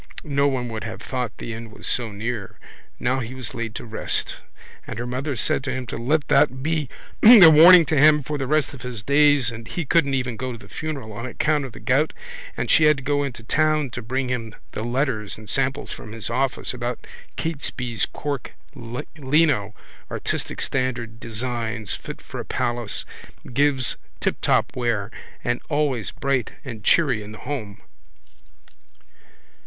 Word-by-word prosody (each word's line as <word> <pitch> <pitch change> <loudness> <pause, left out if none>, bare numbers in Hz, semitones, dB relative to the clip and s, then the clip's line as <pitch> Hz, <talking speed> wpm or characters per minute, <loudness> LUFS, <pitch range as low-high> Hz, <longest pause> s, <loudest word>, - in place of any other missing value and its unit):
No 140 -3 +2
one 130 -3 -1
would 110 -3 -5
have 110 0 -6
thought 125 -3 -4
the 115 - -5
end 115 0 -8
was - - -10
so 120 -3 -1
near. 105 0 -4 0.4
Now 130 +2 +1
he 125 +1 -5
was 130 -3 -5
laid 115 -1 -4
to - - -6
rest. 110 -1 -1 0.5
And - - -6
her 120 - -3
mother 130 +3 -2
said 120 +4 +2
to - - -1
him 130 -1 -3
to - - -5
let 145 +5 +1
that 130 -3 +3
be 155 -3 0 0.3
a 215 -7 +11
warning 170 +2 +9
to 155 - 0
him 150 0 +6
for 150 +2 -3
the 135 - -2
rest 150 -1 +1
of 130 - -10
his 120 -4 -6
days 140 -2 +4
and 115 0 -9
he 175 - -3
couldn't 140 -2 +3
even 125 -3 -2
go 130 +3 -3
to 120 - -7
the - - -14
funeral 140 -9 -5
on 115 +5 -5
account 150 +3 0
of 130 - -9
the - - -10
gout 140 +4 +2 0.4
and - - -1
she 155 - +6
had 150 -1 +5
to 140 - -8
go 145 +1 +1
into 130 -5 -4
town 155 +1 +1
to 120 - -5
bring 130 +3 -2
him 115 -4 -3 0.2
the - - -5
letters 120 -3 -1
and 110 -1 -9
samples 135 0 -1
from 105 - -8
his 115 0 -5
office 130 +2 -1
about 120 -1 -4 0.3
Catesby's 125 -8 -2
cork 145 -3 -4 0.2
lino, 130 -2 0 0.3
artistic, - - -3
standard 120 -4 -2
designs, 115 -2 -3
fit - - -7
for - - -7
a - - -3
palace, 120 -3 -1 0.5
gives 135 -2 +2 0.2
tiptop - - +1
wear 115 -5 -1 0.3
and 120 0 -1
always 145 - 0
bright 135 -4 -1
and 115 -5 -7
cheery 135 -8 +3
in 105 +1 -9
the - - -9
home. 110 -9 -5
130 Hz, 180 wpm, -23 LUFS, 115-145 Hz, 0.5 s, a